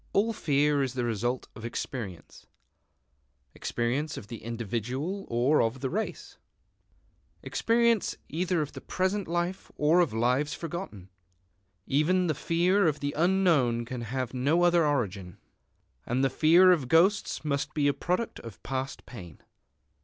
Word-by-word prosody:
All 225 +3 +2
fear 145 -5 +2
is 130 -2 -2
the 125 -2 -1
result 120 +3 -2
of 115 - -10
experience, 115 -6 -6 1.1
experience 130 +6 -2
of 105 - -9
the 115 -2 -7
individual 120 - -4
or 125 +6 +3
of 115 +3 -1
the 130 - -2
race, 220 +4 -4 1.0
experience 230 -2 +1
either 175 +1 0
of 145 - -8
the - - -8
present 190 +2 -1
life 175 +3 -3
or 155 +4 +4
of 170 -6 +3
lives 125 +6 +1
forgotten. 165 - -7 0.8
Even 175 +6 +2
the 160 - +1
fear 175 +6 +2
of 150 -2 0
the 145 0 -2
unknown 160 -9 +2
can 125 0 -5
have 125 +2 -3
no 145 +7 +2
other 175 -2 +4
origin. 100 -10 -2 0.7
And 125 +3 0
the 135 - +2
fear 170 +6 +6
of 155 -8 +1
ghosts 170 +3 +2
must 140 -2 -2
be 145 -2 +2
a 145 - +3
product 180 - -2
of 115 -3 -11
past 135 0 -4
pain. 90 - -11
145 Hz, 145 wpm, -28 LUFS, 120-175 Hz, 1.1 s, fear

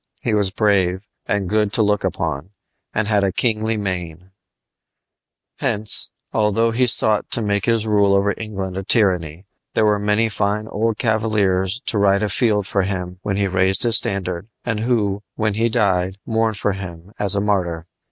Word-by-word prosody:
He 115 - 0
was 105 -2 +2
brave, 95 -3 +1 0.3
and 100 -2 -1
good 105 +1 +1
to 110 - +2
look 105 -1 +1
upon, 80 -4 -3 0.4
and 105 -1 -1
had 105 -2 +2
a 95 - +1
kingly 110 +1 0
mien. 90 -3 -5 1.3
Hence, 105 0 +1 0.2
although 110 +1 +2
he 125 +2 +2
sought 110 -2 +2
to 120 - +2
make 100 -1 0
his 115 -2 +1
rule 100 -2 +3
over 100 +1 +2
England 95 -4 -5
a 95 - -3
tyranny, 90 -5 +1 0.3
there 110 - +3
were 105 -1 +2
many 105 +2 +1
fine 105 0 -1
old 110 0 -1
cavaliers 105 -3 0
to 105 - -1
ride 100 +1 +3
afield 105 0 +1
for 100 - 0
him 90 -2 -4
when 100 -1 -2
he 100 - +1
raised 95 0 +3
his 115 -2 +4
standard, 95 -1 -3 0.2
and 115 -3 -1
who, 105 -4 0
when 110 -1 0
he 115 +3 +1
died, 95 -3 +1
mourned 110 -1 0
for 105 - 0
him 90 -1 -7
as 100 0 +4
a - - +2
"martyr." 90 -5 -1
100 Hz, 170 wpm, -20 LUFS, 95-110 Hz, 1.3 s, his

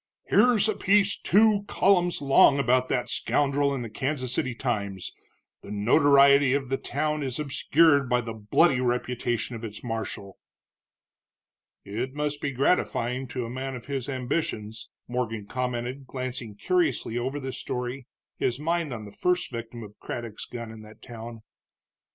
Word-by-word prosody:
"Here's 230 -4 +5
a 215 - 0
piece 200 +1 +3
two 210 0 +3
columns 175 -5 +2
long 140 0 +6
about 130 -1 +2
that 125 -1 0
scoundrel 140 0 +1
in 135 -3 -3
the 115 - -6
Kansas 130 0 -2
City 130 -2 -1
Times 100 -7 -3 0.5
the - - -12
notoriety 140 +5 +5
of 135 -3 -2
the 135 - 0
town 150 +2 -2
is 130 -3 -2
obscured 145 0 +3
by 125 0 +2
the 115 -1 -6
bloody 125 +6 +2
reputation 125 -1 -1
of 115 - -8
its 105 -2 -7
marshal." 110 -4 -5 1.5
"It 120 +7 -4
must 150 0 -2
be 145 - -1
gratifying 130 -2 0
to 125 0 -4
a - - -6
man 130 +1 -4
of 120 - -9
his 135 -1 -4
ambitions," 120 -5 -3 0.2
Morgan 115 -4 -3
commented, 125 +3 -4
glancing 125 -4 -5
curiously 335 - 0
over 130 +4 -3
the 130 -1 -5
story, 125 +1 -5 0.3
his 125 +1 -1
mind 165 0 -1
on 110 -3 -6
the 100 - -10
first 180 - 0
victim 115 0 -7
of 105 0 -13
Craddock's 115 -3 -6
gun 115 -2 -7
in 110 -1 -11
that 110 0 -15
town. 115 -2 -9
130 Hz, 155 wpm, -26 LUFS, 115-145 Hz, 1.5 s, long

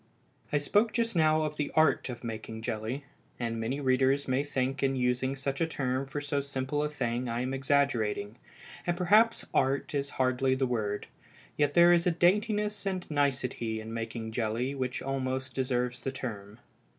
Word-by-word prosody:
I 145 - +3
spoke 210 +9 +2
just 230 -3 0
now 155 -1 +4
of 150 0 -3
the 150 - -1
art 155 -4 +3
of 120 -1 -7
making 110 -1 -6
jelly, 115 +6 -3 0.3
and 115 -1 -2
many 120 +5 -2
readers 135 +1 +2
may 130 +2 +1
think 135 -1 -1
in 135 0 +2
using 125 +1 0
such 135 +1 -3
a 165 - +3
term 135 -3 -2
for 140 +2 -4
so 145 0 -1
simple 140 +1 -2
a 150 - 0
thing 125 -4 -2
I 115 +1 -1
am 130 +1 -2
exaggerating, 125 -6 0 0.5
and 175 0 +1
perhaps 210 +6 +4
"art" 135 +2 +1
is 140 -1 -1
hardly 130 0 +2
the 130 0 +1
word, 110 -5 -2 0.5
yet 145 -1 +1
there 175 0 +8
is 170 0 +3
a - - +4
daintiness 210 +4 +1
and 185 -2 -2
nicety 130 -6 0
in 110 +1 -7
making 115 0 -4
jelly 115 +3 -1
which 130 -2 -3
almost 130 -1 -2
deserves 125 -1 -1
the 135 - -2
term. 105 -6 -6
135 Hz, 175 wpm, -30 LUFS, 125-145 Hz, 0.5 s, there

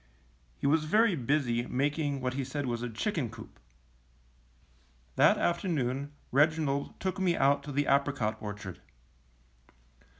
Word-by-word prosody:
He - - -5
was 155 +2 +3
very 215 +4 +3
busy 125 -3 0
making 145 +1 -1
what 125 0 -1
he 135 +1 -2
said 140 +2 -3
was 120 -2 -2
a 120 - -3
chicken 135 - -2
coop. - - -12 1.6
That - - +5
afternoon 145 -6 -1 0.2
Reginald 145 0 +1
took 190 0 -2
me 180 -3 +2
out 140 +1 +3
to 145 - -6
the 145 +1 +1
apricot 140 -6 +1
orchard. 105 -3 -7
140 Hz, 130 wpm, -30 LUFS, 125-155 Hz, 1.6 s, That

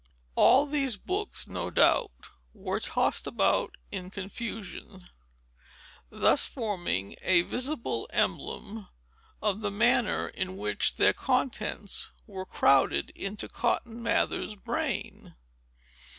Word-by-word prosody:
All 265 - +6
these 275 -6 0
books, 395 - -3
no 90 -1 -3
doubt, - - +2 0.3
were - - -2
tossed - - 0
about - - +1
in 185 -1 -5
confusion, 200 -2 -7 1.0
thus - - +3
forming 180 - -2
a 175 -2 +4
visible 255 - -2
emblem 215 -1 -2 0.6
of 210 0 +1
the 205 - 0
manner 235 +2 +2
in 185 0 -4
which - - 0
their - - +5
contents 240 -6 -1 0.2
were 190 -3 -7
crowded 135 -6 +3
into 200 +2 -5
Cotton 235 0 -1
Mather's 230 -2 0
brain. 200 - -4
210 Hz, 105 wpm, -29 LUFS, 185-235 Hz, 1.0 s, All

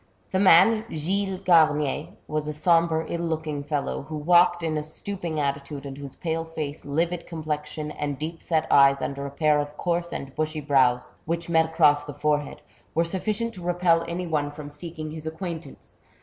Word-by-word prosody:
The 190 - +1
man, 200 +4 +6
Gilles 190 +5 -1
Garnier, 155 -5 +3 0.2
was 150 0 -2
a 150 - -2
sombre, 165 0 +2
iU 170 - -3
looking 160 -3 -2
fellow, 145 -1 -2
who 155 - -4
walked 175 +2 +4
in 160 -1 -1
a 150 - 0
stooping 165 +1 -4
attitude, 140 0 -3
and 135 -1 -6
whose 140 -1 -9
pale 165 -1 -2
face, 155 -3 -6
livid 170 +4 -1
complexion, 155 -2 -4
and 145 -2 -3
deep 160 +3 -5
set 160 -2 0
eyes 140 0 +6
under 140 0 -3
a - - -5
pair 150 +1 +2
of 145 0 -4
coarse 170 0 -1
and 135 -1 -6
bushy 155 +1 -2
brows, 130 -4 +2
which 170 +1 -2
met 160 -1 +4
across 155 -3 +4
the 145 -1 -8
forehead, 150 -1 -1 0.3
were 165 - +3
sufficient 215 +6 -2
to 185 - -9
repel 175 -1 +2
any 175 +2 -3
one 150 -3 0
from 145 0 -9
seeking 155 +1 -6
his 160 0 -6
acquaintance. 160 -3 -7
155 Hz, 180 wpm, -25 LUFS, 145-170 Hz, 0.3 s, man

